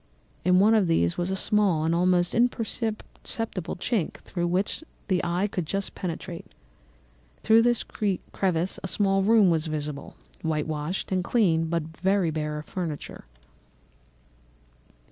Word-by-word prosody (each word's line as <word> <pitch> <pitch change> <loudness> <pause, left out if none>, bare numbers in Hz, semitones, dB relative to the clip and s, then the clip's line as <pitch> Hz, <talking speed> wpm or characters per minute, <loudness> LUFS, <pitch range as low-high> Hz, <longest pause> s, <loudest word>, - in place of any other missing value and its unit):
In 180 +1 +4
one 210 +3 +5
of 210 -5 +4
these 85 - +2
was 175 +1 -2
a 190 - 0
small 190 -5 +2
and 165 +1 +1
almost 175 0 +2
imperceptible 225 -4 -2
chink 190 -1 -1
through 175 -1 -4
which 190 - -1 0.3
the 185 -2 +2
eye 175 +3 0
could 180 -5 -3
just 195 +3 -2
penetrate. 170 0 -5 1.0
Through 225 +1 +6
this 240 0 +2
crevice 185 -3 -1
a - - -2
small 195 0 +2
room 205 -2 +5
was 160 -1 0
visible, 150 -2 -5 0.3
whitewashed 155 +2 -2
and 185 -1 +1
clean 175 -7 +2
but 170 0 0 0.2
very 190 -3 +2
bare 150 -1 -2
of 150 - -7
furniture. 165 - -5
180 Hz, 135 wpm, -26 LUFS, 160-200 Hz, 1.0 s, Through